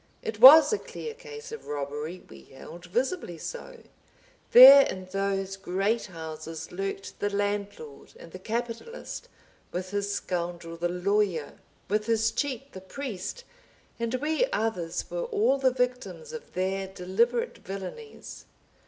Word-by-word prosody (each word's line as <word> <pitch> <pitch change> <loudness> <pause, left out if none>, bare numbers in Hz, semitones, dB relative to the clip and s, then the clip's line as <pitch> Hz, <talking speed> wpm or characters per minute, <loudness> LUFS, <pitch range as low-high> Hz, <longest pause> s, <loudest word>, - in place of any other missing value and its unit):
It 215 -1 -5
was 290 - +10
a 425 - 0
clear 460 - -7
case 455 0 -10
of 455 - -9
robbery, 150 +4 -5
we 70 - -13
held, 170 +6 -12
visibly 245 - -2
so; - - -8 0.7
there 270 +3 +11
in 185 0 -6
those 195 0 -2
great 195 +4 -1
houses 160 -2 -8
lurked 195 +1 -5
the 205 - 0
Landlord 205 -7 -4
and 165 - -12
the 185 - -9
Capitalist, 240 - -5 0.4
with 185 +1 -5
his 200 0 -1
scoundrel 175 -3 -4
the 175 +1 -2
Lawyer, 180 -3 -1 0.3
with 210 +2 -1
his 225 0 +2
cheat 270 +2 -3
the 190 - -9
Priest, 240 - -6 0.6
and 235 +1 -1
we 310 - 0
others 175 - -2
were - - -2
all 420 - +1
the 265 -1 +4
victims 250 - -3
of 475 +1 -9
their 190 +1 -1
deliberate 195 +6 -1
villainies. 195 - -8
205 Hz, 135 wpm, -27 LUFS, 180-260 Hz, 0.7 s, there